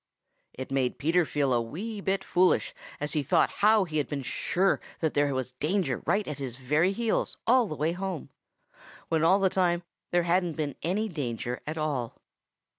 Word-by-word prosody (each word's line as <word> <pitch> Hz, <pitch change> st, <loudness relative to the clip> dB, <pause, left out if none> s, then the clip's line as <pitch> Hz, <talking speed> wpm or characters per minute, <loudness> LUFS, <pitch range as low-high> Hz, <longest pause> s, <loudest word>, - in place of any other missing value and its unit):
It 130 Hz, +1 st, -7 dB
made 130 Hz, -2 st, 0 dB
Peter 165 Hz, +4 st, +2 dB
feel 140 Hz, -3 st, +1 dB
a 120 Hz, -, +2 dB
wee 200 Hz, -, -5 dB
bit 190 Hz, 0 st, 0 dB
foolish 180 Hz, +1 st, +2 dB, 0.3 s
as 150 Hz, +1 st, -2 dB
he 155 Hz, -, +1 dB
thought 140 Hz, -, +2 dB
how 215 Hz, 0 st, +6 dB
he 155 Hz, -4 st, -2 dB
had 145 Hz, -, -1 dB
been 140 Hz, -2 st, -4 dB
sure 190 Hz, +8 st, +1 dB, 0.2 s
that 160 Hz, -2 st, 0 dB
there 145 Hz, 0 st, +2 dB
was 130 Hz, -1 st, -3 dB
danger 170 Hz, +9 st, -1 dB
right 205 Hz, +1 st, +1 dB
at 150 Hz, -1 st, -5 dB
his 130 Hz, -4 st, -5 dB
very 150 Hz, +8 st, +2 dB
heels 225 Hz, +2 st, -1 dB
all 245 Hz, -1 st, +4 dB
the 155 Hz, -, -5 dB
way 155 Hz, +3 st, 0 dB
home, 180 Hz, -4 st, -4 dB, 0.8 s
when 160 Hz, -1 st, +1 dB
all 185 Hz, +4 st, +6 dB
the 195 Hz, -1 st, +3 dB
time 180 Hz, -2 st, +1 dB, 0.3 s
there 175 Hz, 0 st, +2 dB
hadn't 175 Hz, 0 st, +1 dB
been 150 Hz, -3 st, -2 dB
any 195 Hz, +7 st, 0 dB
danger 125 Hz, -, -4 dB
at 155 Hz, +2 st, -3 dB
all. 140 Hz, -7 st, -2 dB
160 Hz, 190 wpm, -28 LUFS, 140-190 Hz, 0.8 s, how